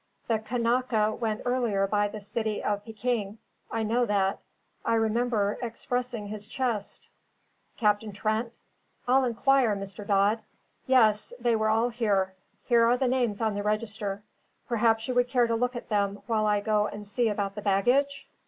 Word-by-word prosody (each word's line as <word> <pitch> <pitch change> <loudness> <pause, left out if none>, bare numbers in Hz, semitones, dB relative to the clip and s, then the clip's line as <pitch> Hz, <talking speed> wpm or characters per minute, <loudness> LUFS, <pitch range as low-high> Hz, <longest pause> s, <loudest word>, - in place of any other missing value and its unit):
The 225 -2 +1
Kanaka 230 -1 +1
went 220 -2 -3
earlier 240 -6 +1
by 205 +1 +1
the 215 +1 -7
City 215 +1 -3
of 205 0 -1
Pekin; 220 -2 -3 0.3
I 225 - -2
know 235 +3 +1
that; 195 -2 +1 0.4
I 230 - +1
remember 225 -2 +1
expressing 245 -1 -3
his 210 0 -7
chest. 230 -4 -3 0.7
Captain 210 0 +1
Trent? 220 +3 -2 0.5
I'll 265 +2 +4
inquire, 250 -1 +3
Mr. 195 +1 -7
Dodd. 205 +2 +3 0.5
Yes, 220 -4 +3
they 235 -1 +2
were 220 0 +1
all 225 +2 +2
here. 205 -5 0 0.3
Here 235 -1 +4
are 235 +2 +4
the 260 - +1
names 245 -4 0
on 220 -1 +1
the 205 - -2
register; 210 -1 -2 0.4
perhaps 225 -1 +2
you 255 - -1
would 245 0 +3
care 245 -2 +3
to 230 - -1
look 250 +2 -1
at 240 - -7
them 200 -1 0
while 215 -2 +1
I 205 -1 +2
go 210 0 +1
and 205 0 -8
see 225 +3 +1
about 200 -2 -2
the 210 - -6
baggage?" 245 +9 +1
220 Hz, 165 wpm, -27 LUFS, 205-240 Hz, 0.7 s, I'll